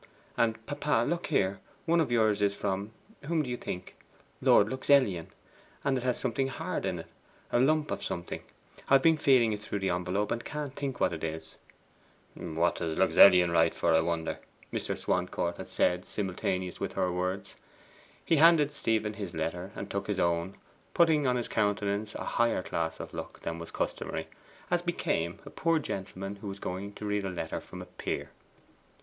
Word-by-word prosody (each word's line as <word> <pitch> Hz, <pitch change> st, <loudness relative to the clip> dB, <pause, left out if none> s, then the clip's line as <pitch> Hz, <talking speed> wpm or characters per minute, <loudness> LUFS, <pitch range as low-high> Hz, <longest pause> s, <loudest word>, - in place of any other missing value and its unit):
And, 115 Hz, -1 st, 0 dB
papa, 145 Hz, -4 st, +1 dB
look 170 Hz, 0 st, -1 dB
here, 100 Hz, -9 st, +1 dB, 0.3 s
one 170 Hz, 0 st, +4 dB
of 140 Hz, -6 st, -1 dB
yours 110 Hz, -3 st, +3 dB
is 100 Hz, 0 st, +2 dB
from 100 Hz, +2 st, -2 dB, 0.4 s
whom 160 Hz, 0 st, +1 dB
do 130 Hz, -, -5 dB
you -, -, 0 dB
think? 90 Hz, -6 st, -6 dB, 0.5 s
Lord 100 Hz, -, +6 dB
Luxellian. 130 Hz, -, +2 dB, 0.6 s
And 140 Hz, -1 st, +2 dB
it 125 Hz, -, -2 dB
has 125 Hz, -1 st, +1 dB
something 130 Hz, +1 st, 0 dB
HARD 135 Hz, -, -3 dB
in -, -, -1 dB
it -, -, -14 dB, 0.5 s
a 120 Hz, -, +3 dB
lump 155 Hz, +4 st, +3 dB
of -, -, -2 dB
something. 85 Hz, 0 st, -4 dB, 0.5 s
I've 135 Hz, -1 st, +6 dB
been 160 Hz, -1 st, +5 dB
feeling 125 Hz, -6 st, +4 dB
it 105 Hz, -, -3 dB
through 105 Hz, 0 st, -4 dB
the 95 Hz, -2 st, 0 dB
envelope, 90 Hz, +4 st, -1 dB
and 120 Hz, -, -1 dB
can't 150 Hz, -3 st, -5 dB
think 135 Hz, -3 st, -3 dB
what -, -, +2 dB
it 80 Hz, -, -6 dB
is.' 80 Hz, 0 st, -5 dB, 0.7 s
'What 80 Hz, +2 st, 0 dB
does 80 Hz, -2 st, -2 dB
Luxellian 90 Hz, -3 st, +7 dB
write 80 Hz, -1 st, +3 dB
for, 85 Hz, -, +2 dB
I 80 Hz, -, +5 dB
wonder?' 80 Hz, 0 st, -2 dB, 0.3 s
Mr. -, -, -2 dB
Swancourt 90 Hz, -1 st, -1 dB
had -, -, -8 dB
said 90 Hz, +1 st, +1 dB
simultaneously 95 Hz, -2 st, -2 dB
with -, -, -3 dB
her 90 Hz, -, 0 dB
words. 95 Hz, +2 st, -3 dB, 0.7 s
He 165 Hz, -, +3 dB
handed 155 Hz, -2 st, +6 dB
Stephen 110 Hz, -5 st, 0 dB
his 100 Hz, -5 st, -6 dB
letter, 85 Hz, +4 st, -3 dB
and 100 Hz, -, -5 dB
took 100 Hz, -, -2 dB
his 100 Hz, -2 st, -1 dB
own, 85 Hz, +2 st, +1 dB, 0.4 s
putting 155 Hz, -4 st, +4 dB
on 125 Hz, -, +3 dB
his 120 Hz, -2 st, -1 dB
countenance 105 Hz, 0 st, 0 dB
a -, -, -4 dB
higher 115 Hz, -5 st, +1 dB
class 80 Hz, -2 st, -2 dB
of -, -, -7 dB
look -, -, -7 dB
than 85 Hz, 0 st, -4 dB
was 85 Hz, -, -7 dB
customary, -, -, -3 dB, 0.4 s
as 175 Hz, -1 st, +3 dB
became 90 Hz, -, -1 dB
a -, -, -9 dB
poor 165 Hz, 0 st, +2 dB
gentleman 95 Hz, -7 st, -4 dB
who 100 Hz, -, -8 dB
was 100 Hz, 0 st, -5 dB
going 100 Hz, +2 st, -5 dB
to 105 Hz, -, -7 dB
read 105 Hz, -1 st, 0 dB
a 95 Hz, -, -2 dB
letter 80 Hz, -3 st, -4 dB
from -, -, -9 dB
a -, -, -11 dB
peer. -, -, -4 dB
100 Hz, 185 wpm, -30 LUFS, 90-130 Hz, 0.7 s, Luxellian